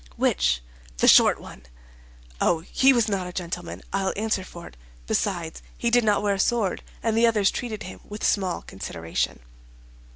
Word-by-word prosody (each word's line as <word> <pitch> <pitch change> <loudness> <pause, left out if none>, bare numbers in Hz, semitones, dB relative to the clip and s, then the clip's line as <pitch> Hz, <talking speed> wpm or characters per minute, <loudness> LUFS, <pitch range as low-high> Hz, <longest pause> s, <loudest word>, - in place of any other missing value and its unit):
"Which?" - - +1 0.3
"The - - +2
short - - +7
one." 60 - -12 0.8
"Oh, 165 -2 +2
he 265 +10 +3
was 235 -4 +2
not 195 -3 -1
a - - -6
gentleman, 175 -1 -5
I'll 195 -1 0
answer 215 -2 -1
for 170 -2 -11
it; - - -13 0.3
besides, 170 - -2 0.2
he 235 - 0
did 245 0 +4
not 210 -1 +2
wear 205 -1 +2
a 195 - -3
sword, 215 -2 +1 0.2
and 225 -1 +1
the 230 +1 +5
others 210 -4 +3
treated 225 -3 -5
him 185 - -9
with 210 0 -9
small 190 -4 0
consideration." 85 -7 -4
195 Hz, 170 wpm, -25 LUFS, 170-220 Hz, 0.8 s, short